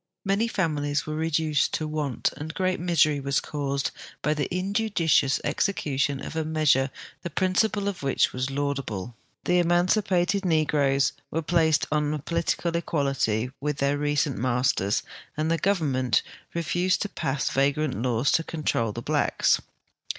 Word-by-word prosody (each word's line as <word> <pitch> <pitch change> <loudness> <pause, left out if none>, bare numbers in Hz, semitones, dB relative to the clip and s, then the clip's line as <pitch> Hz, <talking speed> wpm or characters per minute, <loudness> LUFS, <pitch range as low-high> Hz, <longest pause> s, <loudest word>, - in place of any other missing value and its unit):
Many 200 +4 +2
families 150 -8 -1
were 155 - -4
reduced 155 -1 +1
to 155 - -2
want, 150 -4 -1
and 160 +2 -7
great 185 -1 0
misery 165 -4 +3
was 140 0 0
caused 140 -2 -2 0.3
by 150 - +2
the 150 -2 -2
injudicious 185 -7 +1
execution 145 -4 -1
of - - -7
a 160 - 0
measure 155 -4 +2 0.3
the 175 - -4
prin 185 +2 0
ciple 210 0 +1
of 200 -3 -3
which 135 -1 +1
was 130 +1 -2
laudable. 135 -6 -3 0.3
The 180 0 +3
emaiicipated 180 +2 +2
negroes 145 -5 +2 0.2
were 165 +1 -2
placed 160 -2 +2
on 150 0 +1
a - - -2
political 170 +2 -1
equality 135 -8 0
with 150 0 -1
their 140 +1 +1
recent 145 -4 0
masters, 125 -4 +1 0.3
and 155 +1 0
the 165 - +1
goyernment 140 - +1 0.3
refused 175 +3 +1
to 205 - -4
pass 135 -6 -2
yagrant 140 -3 +1
laws 125 +1 +1
to 165 - +2
control 145 -10 -1
the - - -6
blacks. - - +2
150 Hz, 150 wpm, -26 LUFS, 140-170 Hz, 0.3 s, misery